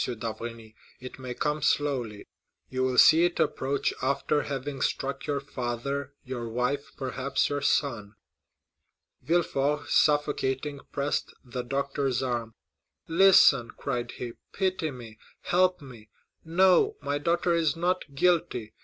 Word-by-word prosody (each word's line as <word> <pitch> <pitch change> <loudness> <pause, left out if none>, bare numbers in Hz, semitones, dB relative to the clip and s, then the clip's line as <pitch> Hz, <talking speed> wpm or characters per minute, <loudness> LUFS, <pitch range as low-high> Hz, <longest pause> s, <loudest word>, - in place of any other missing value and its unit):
d'Avrigny, 115 -1 -6 0.3
"it 130 +1 -10
may 125 -1 -6
come 150 0 -1
slowly; 135 -8 0 0.5
you 130 0 -2
will 130 -1 0
see 160 +5 +7
it 175 0 0
approach 135 +1 0
after 140 +2 +1
having 140 -1 -5
struck 140 0 -2
your 145 -1 0
father, 140 +1 -4
your 120 -3 -5
wife, 125 +5 -2
perhaps 135 0 -1
your 145 0 -2
son." 115 -8 0 1.1
Villefort, 150 -1 0
suffocating, 145 -1 +1
pressed 140 +1 -2
the 125 0 -4
doctor's 135 0 -1
arm. 120 -3 -3 0.5
40124m 165 - -5
"Listen," 140 -11 +6
cried 120 -3 -3
he; 120 -1 -6 0.2
"pity 185 -4 -1
me—help 135 +9 -1
me! 115 -5 -13 0.3
No, 190 - +3
my 145 0 -2
daughter 170 +2 +1
is 160 -3 +1
not 175 -4 -2
guilty. 145 -9 +1
140 Hz, 125 wpm, -27 LUFS, 125-150 Hz, 1.1 s, see